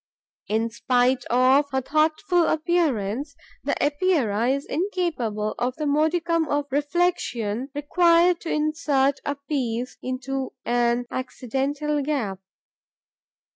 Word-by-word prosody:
In 225 +2 0
spite 250 +2 +1
of 260 +4 +3
her 265 -1 0
thoughtful 315 +5 +2
appearance, 285 - 0 0.3
the 285 - 0
Epeira 285 - +1
is 275 +1 0
incapable 300 - -2
of 250 +1 -1
the 305 - -3
modicum 320 +3 +1
of 290 0 0
reflexion 280 -6 0
required 340 +3 +3
to 330 - -5
insert 300 -3 +1
a 285 - -2
piece 255 -4 -3
into 260 +1 -4
an 240 0 +1
accidental 275 +4 -2
gap. 260 -10 -2
280 Hz, 105 wpm, -24 LUFS, 245-310 Hz, 0.3 s, of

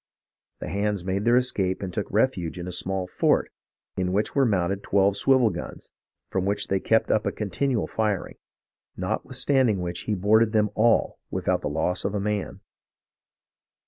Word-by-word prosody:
The - - -4
hands 100 -2 -1
made 100 +2 -1
their 120 +1 +5
escape 100 -7 0
and 90 -2 -5
took - - -3
refuge 95 -7 0
in 90 0 -6
a - - -4
small 95 +1 -2
fort 90 - +1 0.4
in 90 -1 -1
which 105 +3 0
were 135 -2 +3
mounted 95 -1 0
twelve 100 0 +2
swivel 130 -1 +3
guns, 90 - -8 0.4
from 95 - 0
which 100 +1 -1
they 95 - +1
kept 110 +3 +2
up 110 - +1
a - - +1
continual 110 +3 -1
firing; 105 -4 -2 0.6
notwith 110 +8 -3
standing 125 -5 +2
which 90 0 -4
he 105 - 0
boarded 110 +4 +3
them 105 -1 +2
all 115 +1 +2
without - - -1
the - - -2
loss 80 +4 -1
of 100 - -2
a - - 0
man. 105 -1 -3
100 Hz, 175 wpm, -25 LUFS, 95-110 Hz, 0.6 s, their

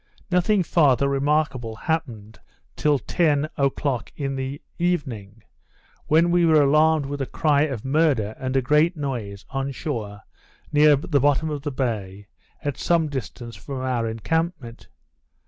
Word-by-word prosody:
Nothing 180 +2 +3
farther 140 -6 +3
remarkable 140 -4 0
happened 115 -6 -4 0.4
till 150 -1 +2
ten 150 0 +1
o'clock 140 -3 -1
in 135 -2 -3
the 135 +2 -4 0.2
evening, 120 - -2 0.6
when 165 +3 +4
we 175 0 +3
were 160 -2 +5
alarmed 155 +1 +3
with 140 +1 -5
the 135 - -2
cry 150 -1 +2
of 125 -5 -5
murder, 135 -7 +1
and 130 0 -3
a 130 - +1
great 150 +6 +3
noise, 115 -9 -5
on 135 0 -2
shore, 110 -8 -5 0.5
near 150 0 +6
the 145 +1 0
bottom 145 +3 +2
of 145 -2 -4
the 145 0 -4
bay, 105 -7 -3 0.4
at 145 -2 -2
some 170 -3 +1
distance 125 -3 -6
from 135 -2 -7
our 125 -3 -1
encampment. 125 - -3
140 Hz, 145 wpm, -23 LUFS, 120-155 Hz, 0.6 s, near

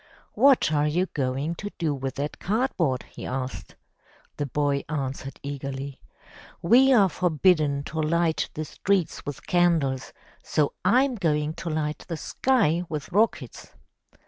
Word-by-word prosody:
"What 270 - +4
are 150 0 +2
you 175 +5 +1
going 135 +3 -1
to 205 - -5
do 160 -4 0
with 135 -1 -4
that 145 +2 -4
cardboard?'' 190 - 0
he - - -9
asked. 130 0 -5 0.6
The 145 - -2
boy 140 +1 0
answered 135 -2 -4
eagerly: 140 -1 -5 0.6
"We 255 +9 +6
are 210 -7 +6
forbidden 155 -5 +2
to 160 +2 -3
light 165 +1 +1
the 155 - -3
streets 190 0 -1
with 145 - -6
candles, 160 -7 +1 0.3
so 150 -2 0
I'm 260 +2 +4
going 155 -7 0
to 170 - -6
light 155 -1 -2
the 165 - -4
sky 195 - +1
with 155 +1 -5
rockets!" 215 +5 -1
155 Hz, 140 wpm, -25 LUFS, 140-180 Hz, 0.6 s, We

